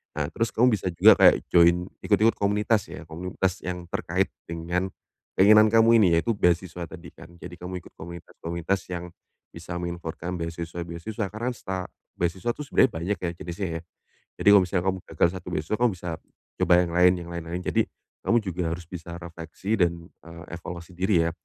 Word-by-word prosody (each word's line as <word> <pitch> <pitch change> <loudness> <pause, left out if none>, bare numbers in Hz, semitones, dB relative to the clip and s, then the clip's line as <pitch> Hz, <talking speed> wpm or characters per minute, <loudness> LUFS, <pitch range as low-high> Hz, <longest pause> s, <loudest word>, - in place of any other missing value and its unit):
Nah, 75 -1 -1
terus 115 +7 -1
kamu 120 0 +4
bisa 95 -2 -3
juga 85 - +7
kayak - - +5
join, 85 +1 +4 0.2
ikut 100 - +3
ikut 115 +2 +4
komunitas 105 -1 +1
ya, 85 -2 -9
komunitas 90 +3 -3
yang 90 -1 -5
terkait - - 0 0.2
dengan 85 +3 -3 0.5
keinginan 105 +2 +7
kamu 115 +1 +6
ini, 85 -3 +4
yaitu 115 +6 0
beasiswa 90 -2 +1
tadi 85 0 -9
kan? - - -13
Jadi 90 - -9
kamu 90 +1 -6
ikut - - -17
komunitas-komunitas 85 +2 -5
yang 90 0 -4 0.5
bisa 85 +1 -6
menginformasikan 85 0 -5
beasiswa-beasiswa. 85 +5 -5
Karena 115 +4 -2
seta 95 -4 -4 0.3
beasiswa 90 +7 0
itu 135 - -8
sebenarnya 130 - +4
banyak 90 +3 -2
ya, 85 - 0
jenisnya 85 +3 -4
ya. - - -12 0.6
Jadi - - +3
kalau 100 -2 +8
misalnya 90 0 -1
kamu 95 0 0 0.2
gagal 85 - +4
satu 90 - -10
beasiswa, 80 +5 -1
kamu 120 +1 +3
bisa 90 -1 -6 0.5
coba - - +3
yang 85 -1 -1
lain, 90 0 +6
yang 85 - -8
lain-lain. 85 +1 -4
Jadi, - - +2 0.4
kamu 120 +1 +3
juga 90 -5 -3
harus 85 -1 -7
bisa 85 -1 -8
refleksi 85 +5 -4
dan, 85 -1 +1 0.2
eee, 85 0 -11
evaluasi 85 +1 -9
diri 90 -2 +2
ya. - - -1
90 Hz, 180 wpm, -26 LUFS, 85-95 Hz, 0.6 s, kalau